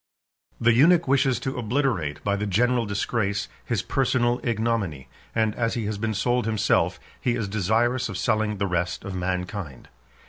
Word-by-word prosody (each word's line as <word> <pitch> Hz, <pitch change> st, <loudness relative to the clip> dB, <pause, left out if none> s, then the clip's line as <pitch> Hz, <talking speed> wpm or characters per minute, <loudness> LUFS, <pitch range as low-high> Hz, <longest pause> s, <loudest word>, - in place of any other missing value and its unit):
The 120 Hz, 0 st, +4 dB
eunuch 165 Hz, +7 st, +5 dB
wishes 135 Hz, -2 st, +3 dB
to 130 Hz, -1 st, -3 dB
obliterate, 110 Hz, -, -1 dB
by 100 Hz, 0 st, +1 dB
the 105 Hz, +1 st, -2 dB
general 120 Hz, +4 st, +2 dB
disgrace, 100 Hz, -1 st, -1 dB, 0.2 s
his 115 Hz, -6 st, -1 dB
personal 125 Hz, -2 st, +1 dB
ignominy; 110 Hz, -, -1 dB, 0.3 s
and 110 Hz, -2 st, +2 dB
as 115 Hz, 0 st, -1 dB
he 115 Hz, -3 st, -2 dB
has 105 Hz, -1 st, -3 dB
been 110 Hz, 0 st, -1 dB
sold 120 Hz, +3 st, +1 dB
himself, 95 Hz, -4 st, +1 dB, 0.2 s
he 120 Hz, -2 st, +1 dB
is 110 Hz, -4 st, -2 dB
desirous 115 Hz, +5 st, +1 dB
of 100 Hz, -, -4 dB
selling 105 Hz, 0 st, 0 dB
the 100 Hz, -, 0 dB
rest 90 Hz, -1 st, -2 dB
of 100 Hz, -, -5 dB
mankind. 90 Hz, -, -4 dB
110 Hz, 165 wpm, -25 LUFS, 95-120 Hz, 0.3 s, eunuch